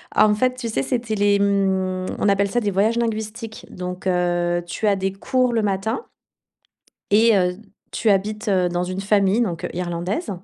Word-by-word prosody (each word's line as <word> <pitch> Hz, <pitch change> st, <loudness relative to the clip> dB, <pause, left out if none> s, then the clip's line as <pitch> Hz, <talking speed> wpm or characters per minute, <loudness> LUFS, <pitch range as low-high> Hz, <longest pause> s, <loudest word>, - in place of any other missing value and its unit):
En 210 Hz, -1 st, +5 dB
fait, 255 Hz, +4 st, +1 dB
tu 245 Hz, -2 st, -5 dB
sais 175 Hz, -11 st, -1 dB
c'était 235 Hz, -, -2 dB
les 205 Hz, 0 st, +3 dB
mmh, 190 Hz, -2 st, +1 dB
on 205 Hz, -, +2 dB
appelle 200 Hz, 0 st, +2 dB
ça 240 Hz, +5 st, 0 dB
des 205 Hz, -2 st, 0 dB
voyages 210 Hz, +5 st, +2 dB
linguistiques. 225 Hz, -1 st, -4 dB
Donc 180 Hz, +1 st, -6 dB
heu, 175 Hz, -1 st, +1 dB
tu 210 Hz, +5 st, -2 dB
as 200 Hz, -, +4 dB
des 195 Hz, 0 st, -1 dB
cours 255 Hz, +5 st, 0 dB
le 225 Hz, -, +2 dB
matin 210 Hz, -, -1 dB, 1.1 s
et 220 Hz, +1 st, +5 dB
heu, 180 Hz, -1 st, +2 dB, 0.4 s
tu 225 Hz, -, +1 dB
habites, 210 Hz, +3 st, 0 dB
heu, 185 Hz, -2 st, +2 dB
dans 175 Hz, 0 st, -1 dB
une 185 Hz, +1 st, -4 dB
famille 200 Hz, +2 st, +2 dB
donc 175 Hz, -8 st, -2 dB
heu, -, -, -1 dB
irlandaise 180 Hz, -, -3 dB
200 Hz, 185 wpm, -22 LUFS, 185-220 Hz, 1.1 s, En